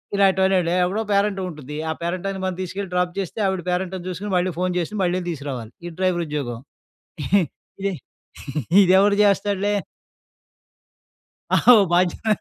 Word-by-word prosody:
ఇలాంటివన్నండి. 190 Hz, -3 st, +3 dB
ఎవడో 195 Hz, +5 st, -1 dB
పేరంటవుంటుంది, 185 Hz, -8 st, -1 dB
ఆ -, -, +1 dB
పేరంటానికి 185 Hz, +2 st, -3 dB
మనం 185 Hz, -1 st, -2 dB
తీసుకెళ్ళి 185 Hz, +1 st, -5 dB
డ్రాప్ 180 Hz, 0 st, +1 dB
చేస్తే, 195 Hz, +3 st, -4 dB
ఆవిడ 190 Hz, -2 st, -2 dB
పేరంటం 185 Hz, 0 st, -2 dB
చూసుకొని 190 Hz, +3 st, -4 dB
మళ్ళీ 180 Hz, 0 st, 0 dB
ఫోన్ 180 Hz, 0 st, 0 dB
చేసి, 175 Hz, +5 st, -4 dB
మళ్ళీ 180 Hz, +1 st, 0 dB
తీసురావాలి. 135 Hz, -7 st, -6 dB
ఇది 175 Hz, -, -6 dB
డ్రైవరుద్యోగం. 150 Hz, -10 st, -1 dB, 1.3 s
ఇది 200 Hz, -, 0 dB, 0.9 s
ఇదెవడు 195 Hz, +2 st, +5 dB
చేస్తాడులే. 205 Hz, 0 st, +1 dB, 1.8 s
ఆహా! 245 Hz, -, +7 dB, 0.2 s
బాధ్యత 180 Hz, +4 st, +1 dB
185 Hz, 115 wpm, -22 LUFS, 175-195 Hz, 1.8 s, ఆహా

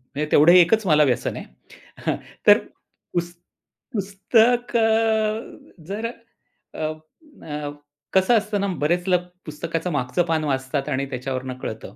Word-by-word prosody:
म्हणजे 150 Hz, +2 st, -1 dB
तेवढं 155 Hz, +4 st, +7 dB
एकच 185 Hz, +5 st, +5 dB
मला 150 Hz, -2 st, +5 dB
व्यसन 130 Hz, -4 st, 0 dB
आहे. -, -, -7 dB, 0.6 s
हां, -, -, +1 dB, 0.3 s
तर -, -, +9 dB, 0.6 s
पुस्त 175 Hz, 0 st, -3 dB, 0.5 s
पुस्त 200 Hz, +2 st, -2 dB, 0.3 s
कं 220 Hz, -1 st, +1 dB, 0.3 s
जरं, 220 Hz, +4 st, -3 dB, 0.6 s
अ, -, -, -9 dB, 0.6 s
अ, 150 Hz, -1 st, -5 dB, 0.4 s
कसं 190 Hz, +5 st, +4 dB
असतं 210 Hz, -1 st, -1 dB
ना, 200 Hz, -, 0 dB, 0.2 s
बरेच 175 Hz, +4 st, +1 dB
लोक 180 Hz, -1 st, +3 dB, 0.2 s
पुस्तकाचं 165 Hz, +3 st, -4 dB
मागचं 145 Hz, +4 st, 0 dB
पान 160 Hz, -1 st, 0 dB
वाचतात 135 Hz, 0 st, -2 dB
आणि 140 Hz, -1 st, -1 dB
त्याच्यावरनं 130 Hz, 0 st, -4 dB
कळतं. 110 Hz, -, -7 dB
170 Hz, 130 wpm, -23 LUFS, 145-205 Hz, 0.6 s, तर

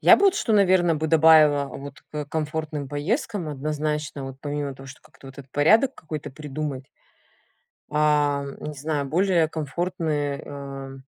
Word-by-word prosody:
Я -, -, +8 dB
бы 405 Hz, -, +2 dB
вот 390 Hz, -, +4 dB
что, 330 Hz, -, 0 dB
наверно, 185 Hz, -4 st, +4 dB
бы 155 Hz, +1 st, -1 dB
добавила 155 Hz, -2 st, +6 dB
вот 140 Hz, +1 st, -9 dB
к 150 Hz, -1 st, -4 dB
комфортным 155 Hz, -1 st, -3 dB
поездкам 175 Hz, -, -2 dB
однозначно, 150 Hz, 0 st, -3 dB
вот 135 Hz, 0 st, -7 dB
помимо 145 Hz, -1 st, -3 dB
того, 135 Hz, +1 st, -12 dB
что 135 Hz, -, -12 dB
вот -, -, -21 dB
как-то 135 Hz, -, -14 dB
этот 135 Hz, 0 st, -12 dB
порядок 220 Hz, -, +4 dB
какой-то 155 Hz, -2 st, -7 dB
придумать. 140 Hz, -1 st, -6 dB, 1.0 s
А, 150 Hz, -1 st, +2 dB, 0.2 s
не 150 Hz, 0 st, -5 dB
знаю, 145 Hz, 0 st, -2 dB
более 170 Hz, +1 st, +2 dB
комфортные, 155 Hz, -2 st, -2 dB
э, 135 Hz, -1 st, -8 dB
150 Hz, 150 wpm, -24 LUFS, 140-160 Hz, 1.0 s, Я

